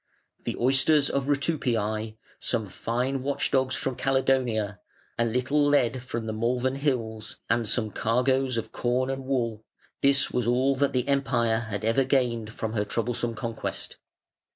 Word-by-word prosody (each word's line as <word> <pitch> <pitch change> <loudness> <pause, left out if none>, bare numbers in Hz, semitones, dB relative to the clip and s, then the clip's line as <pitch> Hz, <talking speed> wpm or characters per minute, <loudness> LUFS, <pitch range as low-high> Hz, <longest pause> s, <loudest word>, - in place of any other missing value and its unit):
The - - -2
oysters 135 +3 +3
of 140 -1 0
Rutupiæ, 115 -7 0 0.2
some 115 -4 -1
fine 125 +7 -2
watch 140 +1 -1
dogs 130 -1 +2
from 130 - -2
Caledonia, 125 -7 +1 0.4
a 115 - +4
little 130 +5 +1
lead 130 -4 +2
from 120 -2 -4
the 110 - -3
Malvern 125 +4 0
Hills, 115 -6 -2
and 115 -2 +1
some 110 -2 0
cargoes 130 +3 +1
of 115 - -3
corn 125 +2 0
and 135 0 -5
wool 115 -5 -1 0.4
this 140 0 +3
was 125 -2 0
all 130 +3 +3
that 140 0 +1
the 125 0 0
Empire 120 -5 +1
had 105 0 -3
ever 115 +4 +3
gained 120 -4 +1
from 110 0 -4
her 105 -2 +1
troublesome 115 +1 -1
conquest. 115 -1 -4
125 Hz, 155 wpm, -27 LUFS, 115-135 Hz, 0.4 s, a